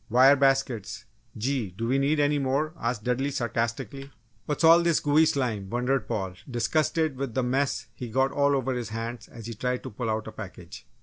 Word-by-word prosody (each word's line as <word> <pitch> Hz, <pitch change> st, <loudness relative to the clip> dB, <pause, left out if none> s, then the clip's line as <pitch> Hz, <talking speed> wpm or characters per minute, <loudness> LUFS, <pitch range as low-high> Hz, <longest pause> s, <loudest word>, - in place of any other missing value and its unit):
"Wire 130 Hz, +4 st, +7 dB
baskets! 135 Hz, -6 st, 0 dB, 0.3 s
Gee, 125 Hz, -2 st, -1 dB
do 115 Hz, +1 st, -2 dB
we 135 Hz, +3 st, +2 dB
need 145 Hz, +3 st, +2 dB
any 145 Hz, 0 st, +2 dB
more?" 140 Hz, +3 st, 0 dB
asked 115 Hz, -2 st, -2 dB
Dudley, 125 Hz, +4 st, 0 dB
sarcastically. 120 Hz, +2 st, -3 dB, 0.4 s
"What's 150 Hz, +2 st, -2 dB
all 165 Hz, +1 st, +8 dB
this 170 Hz, -2 st, +2 dB
gooey 150 Hz, +2 st, +4 dB
slime!" 115 Hz, -10 st, -1 dB
wondered 125 Hz, 0 st, 0 dB
Paul, 95 Hz, -4 st, -2 dB, 0.2 s
disgusted 155 Hz, +4 st, 0 dB
with 135 Hz, -4 st, -4 dB
the 130 Hz, -, +1 dB
mess 135 Hz, +3 st, 0 dB
he 120 Hz, +1 st, -7 dB
got 135 Hz, +4 st, +2 dB
all 140 Hz, 0 st, +2 dB
over 135 Hz, -1 st, 0 dB
his 120 Hz, -3 st, -4 dB
hands 115 Hz, +2 st, -5 dB
as 115 Hz, -2 st, -11 dB
he 115 Hz, -, -5 dB
tried 125 Hz, +3 st, -2 dB
to -, -, -7 dB
pull 115 Hz, +2 st, -3 dB
out 110 Hz, 0 st, -1 dB
a 110 Hz, -, -7 dB
package. 105 Hz, -4 st, -10 dB
130 Hz, 195 wpm, -27 LUFS, 115-140 Hz, 0.4 s, all